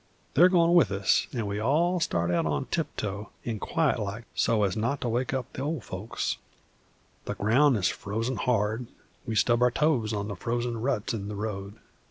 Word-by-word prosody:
They're 175 +5 +7
goin' 170 -2 +4
with 170 - +6
us, 100 0 +2
an' 115 -4 -2
we 100 0 -2
all 165 +10 +2
start 90 - 0
out 85 - 0
tiptoe 105 - -3 0.2
and 110 -3 -3
quiet 155 -6 +1
like 105 +2 -4
so's 105 -4 +2
not 115 +6 -1
to 120 - -1
wake 120 +2 0
up 130 -2 -3
the - - -5
ol' 150 +2 -1
folks. 105 - -4 0.9
The - - -3
ground 125 +5 +4
is 95 - +2
frozen 115 +5 -3
hard; 110 +1 0 0.4
we 110 - -2
stub 120 +2 +3
our 125 - +6
toes 125 -4 +1
on 105 -1 -2
the 100 - -4
frozen 120 +3 -2
ruts 120 -3 -1
in 100 -3 -4
the 105 - -5
road. 100 -1 -4
115 Hz, 185 wpm, -28 LUFS, 105-135 Hz, 0.9 s, They're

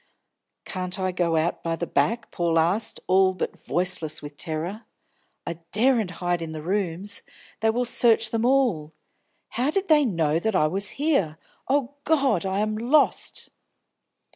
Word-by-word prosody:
"Can't 185 0 -4
I 185 0 0
go 175 -2 0
out 160 +2 0
by 165 0 -1
the 170 - -3
back?" 230 +6 0
Paul 170 -1 0
asked, 175 +7 +1
all 190 0 +3
but 185 - -4
voiceless 175 -3 0
with 145 -1 -10
terror. 165 +9 -4 0.6
"I 170 -1 -5
daren't 225 -1 +3
hide 175 -1 -1
in 160 -1 -5
the 155 -1 -6
rooms; 190 +1 -2 0.4
they 220 - +2
will 245 +3 0
search 225 -2 +3
them 230 -1 0
all. 240 - +2 0.6
How 250 +5 0
did 390 +4 -1
they 300 -2 +6
know 165 - +1
that 220 +3 -1
I 155 - +4
was 195 +6 -1
here? 275 - +1 0.3
O 275 -1 0
God, 270 - +2
I 190 +2 0
am 215 0 -1
lost!" 245 +8 +1
190 Hz, 160 wpm, -25 LUFS, 170-235 Hz, 0.6 s, they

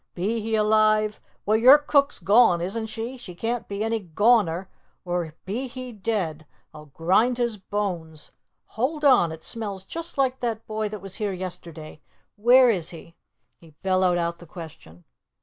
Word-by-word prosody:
Be 210 +6 -1
he 220 +1 -1
alive 215 0 +2 0.2
well, 215 - +3
your 255 +6 +8
cook's 290 -1 +1
gone, 200 -4 +4
isn't 210 +6 -3
she? 230 +4 -6
she 185 -8 -10
can't 230 +5 -3
be 200 +1 -3
any 225 0 0
goner! 190 -1 +2 0.4
or 175 -3 -3
be 230 +8 -3
he 255 0 -8
dead, 190 -8 -3 0.3
I'll 150 0 -12
grind 190 - +1
his 235 -3 -1
bones 180 -6 -5 0.3
hold 295 +7 -2
on! 245 - +5
it 160 0 -9
smells 200 -5 -6
just 335 +4 -6
like 260 -1 +1
that 230 -2 -3
boy 215 -1 -3
that 210 -2 -7
was 195 -1 -7
here 210 -3 -2
yesterday. 170 -4 -8 0.3
Where 245 +3 +6
is 175 -6 -2
he?" 165 0 -12 0.4
He 160 -3 -19
bellowed 185 -2 +2
out 170 0 -2
the 175 - -13
question. 150 - -12
210 Hz, 165 wpm, -24 LUFS, 175-230 Hz, 0.4 s, your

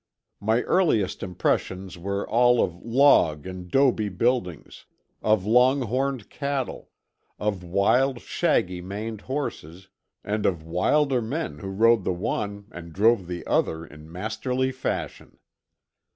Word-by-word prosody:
My 110 +4 +1
earliest 135 - +1
impressions 95 0 -2
were 100 +3 -3
all 120 +2 +4
of 85 - -2
log 115 - +3
and 90 -1 -8
'dobe 110 -6 +2
buildings, 115 - -1 0.3
of 110 -3 +2
long 125 +5 +4
horned 130 0 -2
cattle, 140 -2 -4 0.5
of 100 -3 -2
wild, 120 +9 +2
shaggy 90 -4 0
maned 105 +4 -6
horses, 95 - -5 0.3
and 105 +1 -1
of 85 -4 -1
wilder 125 - +2
men 145 +9 -4
who 100 - -7
rode 115 +2 +3
the - - 0
one 100 +2 -3
and 85 -1 -9
drove 105 +1 +2
the 90 -1 -6
other 80 0 0
in 75 +1 -14
masterly 110 +7 -2
fashion. 130 0 -5
105 Hz, 125 wpm, -25 LUFS, 90-125 Hz, 0.5 s, all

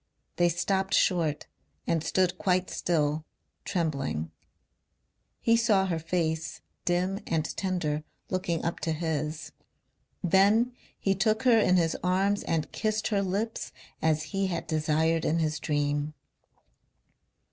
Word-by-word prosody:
They 175 0 +4
stopped 190 +3 0
short 165 -5 +2 0.4
and 165 -2 0
stood 185 0 +1
quite 185 -1 +1
still, 155 -2 0 0.4
trembling. 140 - -1 1.1
He 230 - +3
saw 220 -4 +3
her 170 -3 -1
face, 160 -1 -2 0.2
dim 180 +2 +1
and 160 -2 -1
tender, 170 -6 -1 0.3
looking 175 -3 -1
up 170 - -2
to 160 - -1
his. 155 -1 -3 0.7
Then 205 +7 +4 0.2
he 195 - +1
took 215 +4 +1
her 240 -3 +6
in 185 -4 +4
his 165 -2 +2
arms 195 +3 +2
and 160 -2 -1
kissed 215 0 -1
her 205 -3 +1
lips 200 +4 -2 0.3
as 155 -1 +2
he 195 0 +1
had 170 -2 -3
desired 160 +1 +1
in 160 - +1
his 155 -2 0
dream.... 145 +1 -1
170 Hz, 125 wpm, -28 LUFS, 155-195 Hz, 1.1 s, her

